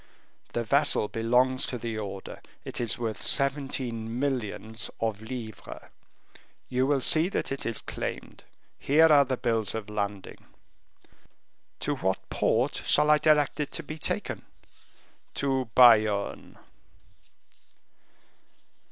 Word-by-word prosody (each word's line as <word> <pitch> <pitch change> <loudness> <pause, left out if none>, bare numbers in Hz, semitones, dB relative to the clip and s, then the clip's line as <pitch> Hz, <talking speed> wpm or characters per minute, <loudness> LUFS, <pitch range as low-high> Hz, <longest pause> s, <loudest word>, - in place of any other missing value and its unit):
The 120 - -1
vessel 140 -2 +2
belongs 125 +3 +2
to 125 - -4
the 115 -2 -4
order; 100 -2 -7 0.2
it - - -3
is 120 - -1
worth 115 -4 -4
seventeen 130 -5 0
millions 115 -4 -2
of 110 -2 -2
livres; 110 -2 -8 0.8
you 130 +1 +1
will 140 -2 +1
see 160 +7 +4
that - - -3
it 135 - -4
is 115 - -2
claimed; - - -6 0.4
here 155 +3 +5
are 140 -1 +6
the 130 -1 -2
bills 115 -4 -1
of 105 -1 -6
landing." 100 -2 -5 1.3
"To - - -1
what 95 0 -2
port 125 +6 0
shall 150 +1 +4
I 150 - +5
direct 150 -1 +2
it 150 - -1
to 165 - -3
be 155 +2 -8
taken?" - - -3 0.9
"To 135 -3 -1
Bayonne." 110 -5 +4
125 Hz, 120 wpm, -27 LUFS, 110-140 Hz, 1.3 s, are